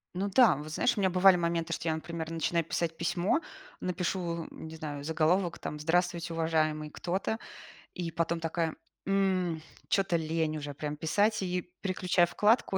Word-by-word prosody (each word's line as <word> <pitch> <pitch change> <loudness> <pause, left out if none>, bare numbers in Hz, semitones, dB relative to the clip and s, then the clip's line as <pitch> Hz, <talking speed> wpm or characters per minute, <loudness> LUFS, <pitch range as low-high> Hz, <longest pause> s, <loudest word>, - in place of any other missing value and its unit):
Ну 195 +3 -1
да. 245 +3 +6
Вот, 150 +2 -7
знаешь, 245 +10 +2
у 210 - -2
меня 190 - +3
бывали 180 0 +6
моменты, 170 -1 0
что 165 - -4
я, 160 - +1
например, 160 0 -5
начинаю 165 +1 0
писать 165 +1 -2
письмо, 175 - +1 0.4
напишу, 175 -2 -2
м, - - -9
не 160 - -8
знаю, 145 -3 -5
заголовок, 165 +3 +1
там: 150 - -5
"Здравствуйте, 170 +1 0
уважаемый 155 -2 0
кто-то". 190 +7 -2 0.5
И 170 -3 -4
потом 165 +1 0
такая: 165 0 -1 0.3
"М, 185 -4 +1 0.3
чё-то 190 -3 +2
лень 160 -1 -1
уже 145 -1 -5
прям 150 +1 -4
писать". 205 +8 +2
И 180 -1 -3
переключаю 180 -2 +2
вкладку, 210 +1 +3
170 Hz, 165 wpm, -30 LUFS, 160-185 Hz, 0.5 s, да